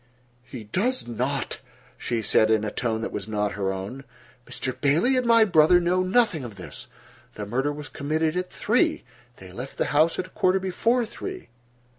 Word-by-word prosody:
"He 125 Hz, -2 st, -9 dB
does 210 Hz, -, -1 dB
not," 125 Hz, +3 st, -2 dB, 0.4 s
she 115 Hz, -2 st, -3 dB
said 110 Hz, -, +3 dB
in 110 Hz, -1 st, +3 dB
a 105 Hz, -, -2 dB
tone 115 Hz, -3 st, -2 dB
that -, -, -3 dB
was 100 Hz, 0 st, -5 dB
not 105 Hz, -1 st, -1 dB
her 95 Hz, -1 st, -2 dB
own. 100 Hz, +8 st, -6 dB, 0.4 s
"Mr. 130 Hz, -1 st, -4 dB
Bailey 165 Hz, -, +3 dB
and 255 Hz, -1 st, +1 dB
my 230 Hz, -1 st, +6 dB
brother 175 Hz, -2 st, +5 dB
know 180 Hz, +1 st, +1 dB
nothing 185 Hz, -, +2 dB
of 115 Hz, -4 st, -8 dB
this. 90 Hz, -, -9 dB, 0.5 s
The 105 Hz, -, -5 dB
murder 130 Hz, +7 st, -1 dB
was 145 Hz, 0 st, -7 dB
committed 155 Hz, +4 st, -1 dB
at 180 Hz, 0 st, -2 dB
three. 230 Hz, +4 st, +1 dB, 0.3 s
They 95 Hz, -1 st, -12 dB
left 125 Hz, +8 st, -8 dB
the -, -, +1 dB
house 155 Hz, +3 st, +3 dB
at -, -, -2 dB
a -, -, -14 dB
quarter 185 Hz, +1 st, +2 dB
before 230 Hz, +6 st, +1 dB
three." 375 Hz, -, -8 dB
145 Hz, 185 wpm, -25 LUFS, 110-185 Hz, 0.5 s, my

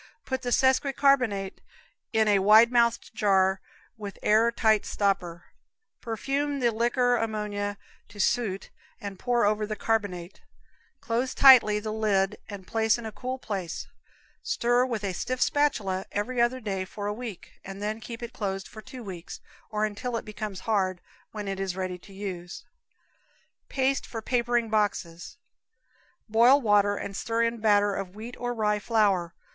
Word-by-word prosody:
Put 260 Hz, -1 st, -2 dB
the 250 Hz, -, -3 dB
sesqui 265 Hz, +2 st, +3 dB
carb. 245 Hz, -9 st, +2 dB, 0.6 s
in 220 Hz, -1 st, +2 dB
a 205 Hz, -2 st, +4 dB
wide 215 Hz, +4 st, +6 dB
mouthed 235 Hz, -2 st, +2 dB
jar 190 Hz, -3 st, +2 dB, 0.4 s
with 205 Hz, -2 st, -7 dB
air 220 Hz, +2 st, +4 dB
tight 220 Hz, -2 st, +2 dB
stopper, 180 Hz, -4 st, -1 dB, 0.6 s
perfume 275 Hz, +5 st, -2 dB
the 240 Hz, -2 st, +2 dB
liquor 240 Hz, +2 st, +2 dB
ammonia 210 Hz, -2 st, -3 dB, 0.3 s
to 205 Hz, -, -14 dB
suit 200 Hz, -2 st, 0 dB, 0.3 s
and 200 Hz, -2 st, -7 dB
pour 240 Hz, -3 st, +1 dB
over 210 Hz, 0 st, +1 dB
the 215 Hz, -, -3 dB
carbonate; 205 Hz, -6 st, -2 dB, 0.6 s
close 240 Hz, +3 st, -1 dB
tightly 245 Hz, -6 st, +7 dB
the 215 Hz, 0 st, -4 dB
lid 210 Hz, -2 st, +1 dB
and 200 Hz, -3 st, -8 dB
place 225 Hz, +1 st, +1 dB
in 235 Hz, -, -8 dB
a 220 Hz, -, -5 dB
cool 255 Hz, +3 st, -5 dB
place; 195 Hz, -9 st, -5 dB, 0.6 s
stir 245 Hz, +1 st, +1 dB
with 230 Hz, -4 st, -3 dB
a 195 Hz, -2 st, -2 dB
stiff 255 Hz, +7 st, -3 dB
spatula 210 Hz, -12 st, +1 dB
every 235 Hz, +4 st, -1 dB
other 240 Hz, +2 st, +2 dB
day 195 Hz, -5 st, -3 dB
for 205 Hz, +2 st, -7 dB
a 205 Hz, -, -1 dB
week, 220 Hz, -4 st, -9 dB
and 195 Hz, +1 st, -8 dB
then 210 Hz, +2 st, -3 dB
keep 230 Hz, +1 st, -8 dB
it 235 Hz, +1 st, -7 dB
closed 195 Hz, -2 st, -3 dB
for 215 Hz, -, -11 dB
two 260 Hz, 0 st, -10 dB
weeks, 185 Hz, -4 st, -8 dB, 0.3 s
or 215 Hz, 0 st, 0 dB
until 230 Hz, +3 st, -3 dB
it -, -, -6 dB
becomes 210 Hz, -2 st, -6 dB
hard, 190 Hz, -5 st, 0 dB, 0.3 s
when 210 Hz, -2 st, -6 dB
it 195 Hz, 0 st, -3 dB
is 190 Hz, -2 st, -2 dB
ready 185 Hz, -1 st, -4 dB
for 195 Hz, -, -16 dB
use. 185 Hz, -3 st, -7 dB, 1.0 s
Paste 270 Hz, 0 st, 0 dB
for 225 Hz, -2 st, -6 dB
Papering 240 Hz, -1 st, +1 dB
Boxes. 205 Hz, -5 st, -2 dB, 0.9 s
Boil 235 Hz, +5 st, +6 dB
water 205 Hz, -4 st, +3 dB
and 200 Hz, -1 st, -6 dB
stir 230 Hz, +2 st, 0 dB
in 230 Hz, 0 st, -1 dB
batter 205 Hz, -2 st, +3 dB
of 195 Hz, -1 st, -5 dB
wheat 230 Hz, +3 st, -8 dB
or 245 Hz, 0 st, -2 dB
rye 210 Hz, -2 st, +1 dB
flour. 200 Hz, -6 st, +1 dB
215 Hz, 160 wpm, -27 LUFS, 200-235 Hz, 1.0 s, tightly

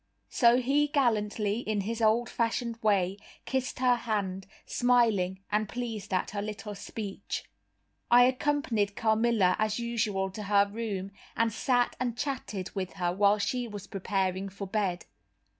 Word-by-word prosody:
So 235 Hz, -1 st, +5 dB
he 275 Hz, +4 st, +2 dB
gallantly, 220 Hz, -6 st, +1 dB
in 215 Hz, -4 st, -1 dB
his 225 Hz, +4 st, -3 dB
old 225 Hz, +2 st, +3 dB
fashioned 230 Hz, 0 st, -2 dB
way, 195 Hz, -3 st, +2 dB, 0.3 s
kissed 260 Hz, -1 st, -2 dB
her 250 Hz, -1 st, +3 dB
hand, 195 Hz, -5 st, -2 dB, 0.2 s
smiling 225 Hz, -7 st, +2 dB
and 210 Hz, 0 st, +1 dB
pleased 225 Hz, -5 st, -5 dB
at 185 Hz, -, 0 dB
her 205 Hz, 0 st, -3 dB
little 210 Hz, 0 st, -5 dB
speech. 200 Hz, 0 st, -5 dB, 0.7 s
I 245 Hz, +1 st, +8 dB
accompanied 255 Hz, -6 st, +1 dB
Carmilla 220 Hz, -4 st, +3 dB
as 215 Hz, -1 st, +1 dB
usual 210 Hz, -5 st, -1 dB
to 210 Hz, -, -7 dB
her 200 Hz, 0 st, +3 dB
room, 200 Hz, -3 st, -4 dB, 0.3 s
and 230 Hz, -1 st, +2 dB
sat 245 Hz, +2 st, +1 dB
and 240 Hz, -2 st, -2 dB
chatted 235 Hz, -9 st, -4 dB
with 190 Hz, -2 st, -4 dB
her 175 Hz, -2 st, -1 dB
while 200 Hz, +2 st, +4 dB
she 240 Hz, +4 st, -1 dB
was 205 Hz, -3 st, -7 dB
preparing 195 Hz, -1 st, -2 dB
for 200 Hz, +1 st, -7 dB
bed. 190 Hz, -3 st, -1 dB
215 Hz, 145 wpm, -29 LUFS, 200-235 Hz, 0.7 s, I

